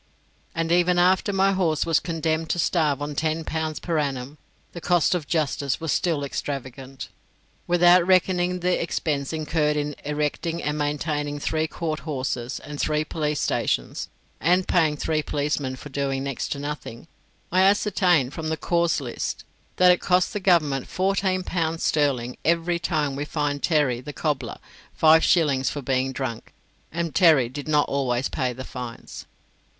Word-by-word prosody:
And 165 0 -1
even 175 +1 +3
after 185 +3 +3
my 195 0 +3
horse 170 -6 +1
was 165 -2 +3
condemned 160 -1 -2
to - - 0
starve 155 -4 +1
on 145 0 -4
ten 155 +2 -1
pounds 160 -1 -3
per 165 -3 -1
annum, 140 0 -3 0.3
the 170 - -8
cost 175 0 +2
of 165 -5 -2
justice 145 -4 0
was 165 -2 -2
still 160 -5 0
extravagant. 135 -1 -5 0.6
Without 175 0 +5
reckoning 180 -1 +2
the 180 +1 +1
expense 145 -4 -2
incurred 155 -1 0
in 150 0 -2
erecting 150 +3 -2
and 150 0 -1
maintaining 145 0 -2
three 155 +2 -1
court 155 -1 -3
houses, 130 -4 -3
and 145 +1 -6
three 155 0 0
police 150 -2 -2
stations, - - -1 0.3
and 180 +3 +2
paying 155 -4 +2
three 155 +1 0
policemen 145 -3 -2
for 150 - -10
doing 135 -1 -2
next 140 -2 -3
to - - -7
nothing, 145 -3 -6 0.4
I 185 +1 +4
ascertained 185 -8 +3
from 160 -1 -4
the 160 - -1
cause 170 -2 +1
lists 125 -3 -4 0.3
that 180 0 +6
it 180 - +2
cost 180 0 +2
the 210 - -2
Government 155 -8 +2
fourteen 190 0 0
pounds 165 -2 -2
sterling 130 -5 0
every 170 +1 +1
time 150 -5 -1
we 140 - -3
fined 145 -2 -2
Terry, 135 -4 +1
the 145 +3 -8
cobbler, 150 -3 -2 0.4
five 160 0 +6
shillings 140 -7 +3
for 145 0 -5
being 130 0 0
drunk; 130 -4 -5 0.4
and 170 -1 -3
Terry 155 -10 +5
did 145 +3 -7
not 150 -1 +3
always 130 -2 0
pay 130 -1 -1
the 130 +2 -8
fines. 125 -2 -8
155 Hz, 160 wpm, -24 LUFS, 140-170 Hz, 0.6 s, that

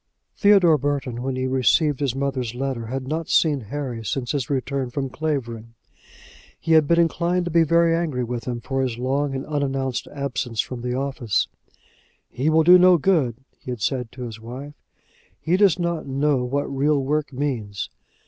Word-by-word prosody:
Theodore 195 -7 +5
Burton, 140 -4 -2
when 130 0 -2
he 130 0 -2
received 130 +3 +2
his 135 -4 -1
mother's 135 -4 -2
letter, 130 -3 -3
had 130 +2 -4
not 160 +2 -3
seen 150 -4 +3
Harry 120 0 -5
since 120 +4 -2
his 140 -5 -2
return 135 -1 -2
from 135 +1 -3
Clavering. 120 -7 -4 0.8
He 165 - -3
had 160 -2 +5
been 170 +2 +3
inclined 170 +1 +1
to 175 - -3
be 165 +1 +4
very 170 +1 +3
angry 155 -7 -1
with 120 -1 -4
him 120 -1 -4
for 135 +1 -2
his 125 -3 -2
long 135 +3 -1
and 130 - -4
unannounced 135 -3 -2
absence 130 -5 -4
from 125 +1 -2
the 125 0 -2
office. 130 -5 -1 0.8
"He 135 +5 0
will 160 0 +4
do 180 +3 +8
no 180 0 +6
good," 150 - +2 0.2
he - - -11
had 120 -4 -4
said 125 -3 -1
to 125 - -7
his 115 -2 -7
wife. 130 +6 -8 0.7
"He 170 - +1
does 195 -3 +4
not 170 -3 -2
know 135 -1 +1
what 140 +3 -1
real 140 +2 +1
work 150 +2 -1
means." 125 -8 -3
135 Hz, 180 wpm, -23 LUFS, 125-155 Hz, 0.8 s, do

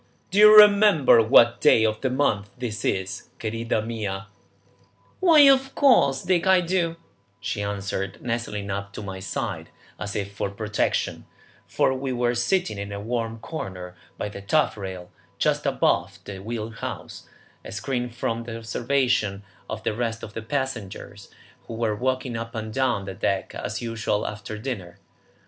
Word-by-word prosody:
"Do 195 - +2
you 215 0 +9
remember 205 - +7
what 120 +2 +5
day 110 - +5
of 110 0 -1
the 130 - 0
month 110 -6 0
this 120 -3 -4
is, 95 0 -2
querida 115 0 -2
mia?" 100 -4 -4 0.9
"Why, 330 -5 +6
of 270 -1 +5
course, 140 - +4
Dick, 180 0 +1
I 190 -1 +6
do," 170 -1 0 0.4
she 105 +1 -3
answered, 100 -1 -3
nestling 115 -4 -3
up 100 0 -5
to 105 - -7
my 95 -1 -6
side 95 - -4 0.3
as 100 -1 -5
if 100 -1 -3
for 100 - -2
protection, 105 +1 -2 0.4
for - - +1
we 130 0 -3
were 120 -1 +1
sitting 120 - 0
in 100 0 -5
a 100 - -5
warm 115 +1 -3
corner 95 - -6 0.2
by - - -3
the 100 -1 -8
taffrail, 95 - -1 0.3
just - - +1
abaft - - 0
the 100 -2 -7
wheel 110 +2 -5
house, - - -7 0.3
and - - -9
screened 120 +3 -3
from 115 0 -2
the 115 -1 -6
observation 115 -3 0 0.3
of 110 0 -5
the - - 0
rest 115 0 -3
of 105 - -8
the 115 - -5
passengers 110 -6 -5 0.4
who 115 - -6
were 110 -2 0
walking 130 +1 -2
up 115 +1 -5
and 110 -1 -5
down 125 -7 0
the 95 - -5
deck 95 -1 -2
as 110 +4 -4
usual 115 -2 -1
after 105 +1 -6
dinner. 100 -7 -6
115 Hz, 160 wpm, -24 LUFS, 100-130 Hz, 0.9 s, you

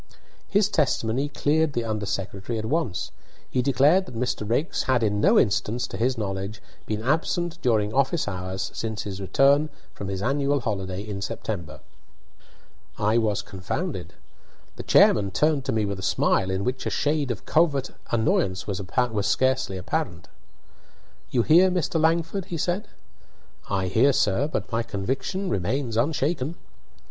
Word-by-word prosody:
His 205 0 +3
testimony 135 - 0
cleared 150 +1 +1
the 120 - -1
under 110 -2 -3
secretary 100 +3 -3
at 110 - -3
once. 130 - -1 0.4
He 125 - 0
declared 145 +8 +3
that 125 - -9
Mr. 115 -3 -2
Raikes 145 +9 0
had 130 -3 +2
in 105 -1 +1
no - - +5
instance, 115 +3 +1
to - - -8
his 125 +2 0
knowledge, 100 0 -3 0.3
been 110 0 -2
absent 165 +5 0
during 110 -3 +1
office 140 +3 +1
hours 95 0 -4
since 110 -2 -3
his 100 -1 -6
return 140 +9 +3 0.2
from 100 - -6
his 95 0 -3
annual 140 +2 +1
holiday 95 -3 -3
in 105 -2 -5
September. 90 - -5 1.2
I 105 +3 +2
was 105 -3 0
confounded. 95 - -4 0.6
The - - -6
chairman 100 -2 +5
turned 145 +7 +1
to 135 - 0
me 110 -3 +1
with 100 -1 -3
a - - -6
smile, 95 0 +1
in 95 +1 -1
which 130 +3 -2
a - - +1
shade 145 -2 0
of 120 +1 -4
covert 150 -5 +2 0.2
annoyance 100 -5 +1
was 100 -2 -3 0.5
scarcely 130 -3 +1
apparent. 90 - -3 1.0
"You 120 - +2
hear, 175 +7 +6
Mr. 175 -3 0
Langford?" 165 +3 +1
he 175 -3 -5
said. 180 +6 -1 0.8
"I 95 -2 0
hear, 115 +10 +3
sir; 105 +5 +2
but 155 - -4
my 115 0 +1
conviction 130 - -3
remains 120 - -1
unshaken." 145 +3 0
120 Hz, 155 wpm, -25 LUFS, 100-145 Hz, 1.2 s, hear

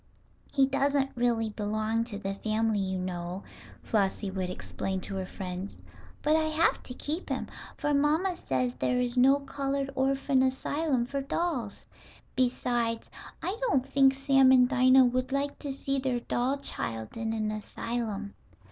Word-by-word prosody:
"He 275 -2 +4
doesn't 275 0 +1
really 235 -2 +1
belong 215 +2 -1
to 220 -4 -6
the 195 -1 -3
family, 215 +1 0
you 190 -1 -1
know," 180 0 -4 0.4
Flossie 200 -1 0
would 185 -1 -2
explain 190 +1 -4
to 195 - -2
her 190 -1 -3
friends. 185 +1 -6 0.4
"But 305 +1 +4
I 315 0 +2
have 315 +1 +2
to 250 - -9
keep 310 +7 -3
him, - - -1 0.3
for 295 -1 0
mamma 310 +6 +2
says 130 - -1
there 250 - 0
is 245 0 -1
no 270 +3 +5
colored 275 0 -2
orphan 270 0 +2
asylum 265 0 0
for 275 +2 -3
dolls. 270 - -2 0.5
Besides, 240 -2 0 0.3
I 380 - -1
don't 275 - +1
think 270 -1 +4
Sam 270 -1 +5
and 250 -1 +6
Dinah 255 0 +6
would 255 +1 0
like 280 +1 -1
to 285 - -4
see 275 0 -2
their 255 -2 -1
doll 250 +4 0
child 115 - -3
in 225 -1 -2
an 215 -1 -1
asylum." 215 -1 -4
250 Hz, 155 wpm, -29 LUFS, 215-275 Hz, 0.5 s, and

